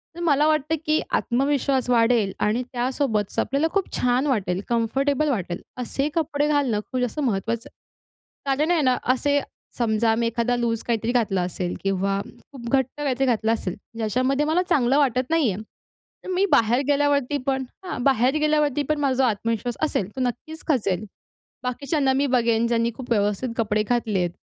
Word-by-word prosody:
तर - - -9
मला 295 -3 +3
वाटतं, 305 0 +1
की 305 +1 +2
आत्मविश्वास 270 0 +1
वाढेल 230 -4 +3
आणि 215 +4 +1
त्यासोबतच 245 -4 -1
आपल्याला 280 +4 +1
खूप 395 -1 0
छान 250 +3 +1
वाटेल, 195 -8 0
कम्फर्टेबल 270 +6 +1
वाटेल, 185 -8 -2 0.2
असे 260 +3 -2
कपडे 295 -2 0
घालणं 280 -8 +1
खूप 255 - -1
जास्त 250 +4 -2
महत्त्वाचं 230 -3 -1 0.8
कारण 285 +4 +1
आहे 335 -3 +3
ना. 255 -2 +3 0.2
असे 285 +2 +1 0.4
समजा, 225 -1 +2
मी 235 0 0
एखादा 235 +1 0
लूज 230 -2 -1
काहीतरी 230 0 -1
घातलं 220 -6 +1
असेल 180 0 -3
किंवा 195 0 0 0.3
खूप 240 -4 -8
घट्ट 265 -2 +2
काहीतरी 270 -2 0
घातलं 225 -3 +1
असेल, 185 -5 -3 0.2
ज्याच्यामध्ये 255 +6 +1
मला 320 +4 +2
चांगलं 270 -4 +3
वाटत 255 -3 +2
नाही 320 -8 +2
आहे, 190 +3 -5 0.6
तर - - -8
मी 375 +2 +3
बाहेर 235 +4 +4
गेल्यावरती 285 -1 +2
पण 265 -1 +1 0.2
हां, 270 -9 -4
बाहेर 265 0 +3
गेल्यावरती 300 -2 +2
पण 305 -1 +1
माझा 275 -3 +1
जो 265 - +3
आत्मविश्वास 230 0 -1
असेल, 255 -11 0
तो 260 - -3
नक्कीच 280 +6 -4
खचेल. 215 - 0 0.6
बाकीच्यांना 265 +2 0
मी 275 +2 +1
बघेन, 235 -3 +2
ज्यांनी 230 0 +1
खूप 250 -1 -9
व्यवस्थित 210 +3 +1
कपडे 215 -2 +1
घातले 220 -3 0
आहेत. 175 -1 0
250 Hz, 165 wpm, -24 LUFS, 225-285 Hz, 0.8 s, बाहेर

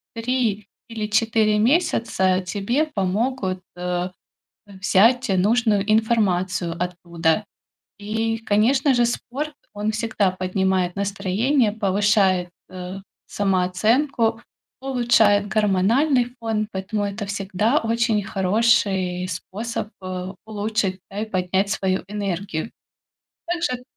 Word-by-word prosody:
3 230 -3 -1 0.2
или 220 -2 -4
4 220 -1 +2
месяца 230 - +2
тебе 205 - 0
помогут, 200 -4 -1
а, 180 0 -2 0.6
э, 200 - -12
взять 225 +7 +4
нужную 210 0 +2
информацию 190 -6 +1
оттуда. 175 +1 -1 0.5
И, 225 +2 -2
конечно 240 +6 +2
же, 240 -1 +3
спорт, 275 +5 -3 0.2
он 210 +1 -1
всегда 220 -3 0
поднимает 185 0 0
настроение, 205 +5 +1
повышает, 200 -3 +2 0.2
а, 185 +1 -7 0.3
самооценку, 220 +6 +1 0.4
улучшает 235 -6 +3
гормональный 220 +7 +2 0.2
фон, 220 -2 -1
поэтому 200 +2 -2
это 200 +1 -4
всегда 205 +6 0
очень 225 -2 +1
хороший 190 -2 +1
способ, 210 +6 -5
а, 185 0 -5
улучшить 210 -3 -2
да 195 - -7
и 220 - -2
поднять 190 -1 0
свою 190 -2 0
энергию. 195 -2 -3 0.8
Также 340 -8 -2
205 Hz, 100 wpm, -22 LUFS, 185-230 Hz, 0.8 s, взять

